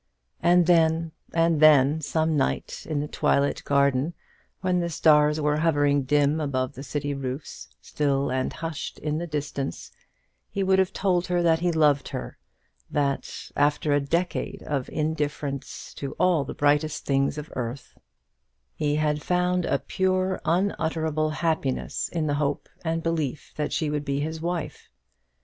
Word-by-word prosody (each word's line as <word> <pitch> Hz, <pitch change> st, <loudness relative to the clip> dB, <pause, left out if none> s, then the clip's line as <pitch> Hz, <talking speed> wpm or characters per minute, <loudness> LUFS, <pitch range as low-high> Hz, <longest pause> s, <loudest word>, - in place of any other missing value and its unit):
And 175 Hz, 0 st, +5 dB
then 165 Hz, -1 st, +3 dB, 0.2 s
and 165 Hz, -1 st, +2 dB
then, 150 Hz, 0 st, +6 dB
some 160 Hz, +1 st, 0 dB
night 70 Hz, -, -2 dB
in 150 Hz, -2 st, 0 dB
the 150 Hz, -, -3 dB
twilit 140 Hz, -1 st, +1 dB
garden, 140 Hz, +3 st, +2 dB, 0.5 s
when 185 Hz, -1 st, +1 dB
the 170 Hz, -1 st, -1 dB
stars 150 Hz, -1 st, +4 dB
were 150 Hz, 0 st, +1 dB
hovering 145 Hz, -3 st, +2 dB
dim 145 Hz, +2 st, +2 dB
about 130 Hz, -4 st, -1 dB
the 130 Hz, -, -9 dB
city 145 Hz, 0 st, -3 dB
roofs 135 Hz, +1 st, -6 dB
still 140 Hz, -2 st, 0 dB
and 130 Hz, 0 st, -1 dB
hushed 165 Hz, -2 st, -5 dB
in 150 Hz, 0 st, -2 dB
the 175 Hz, -, -4 dB
distance, 145 Hz, -3 st, -4 dB, 0.6 s
he 200 Hz, -, -2 dB
would 190 Hz, 0 st, +3 dB
have 190 Hz, -1 st, +2 dB
told 180 Hz, -2 st, 0 dB
her 175 Hz, -1 st, +1 dB
that 165 Hz, -1 st, +3 dB
he 175 Hz, +1 st, +1 dB
loved 150 Hz, -4 st, +3 dB
her; 60 Hz, -, -6 dB, 0.5 s
that, 140 Hz, -2 st, -2 dB
after 145 Hz, +1 st, +2 dB
a 145 Hz, -, +3 dB
decade 175 Hz, +6 st, -2 dB
of 140 Hz, -4 st, -2 dB
indifference 150 Hz, -3 st, -3 dB
to 140 Hz, -, -5 dB
all 175 Hz, -6 st, +2 dB
the -, -, -6 dB
brightest 145 Hz, +1 st, +1 dB
things 140 Hz, +1 st, +1 dB
of 150 Hz, +1 st, -7 dB
earth, 125 Hz, +2 st, -5 dB, 0.8 s
he 150 Hz, -1 st, 0 dB
had 150 Hz, -1 st, 0 dB
found 180 Hz, +1 st, +1 dB
a -, -, +1 dB
pure 185 Hz, 0 st, 0 dB
unutterable 160 Hz, -3 st, 0 dB
happiness 155 Hz, -4 st, -1 dB
in 165 Hz, -3 st, -2 dB
the 145 Hz, -, 0 dB
hope 145 Hz, 0 st, -1 dB, 0.2 s
and 165 Hz, 0 st, -1 dB
belief 155 Hz, -4 st, -2 dB
that 150 Hz, -1 st, -2 dB
she 155 Hz, -2 st, -1 dB
would 150 Hz, -1 st, -1 dB
be 140 Hz, 0 st, -1 dB
his 160 Hz, +2 st, -3 dB
wife. 170 Hz, -1 st, -4 dB
150 Hz, 155 wpm, -25 LUFS, 145-165 Hz, 0.8 s, then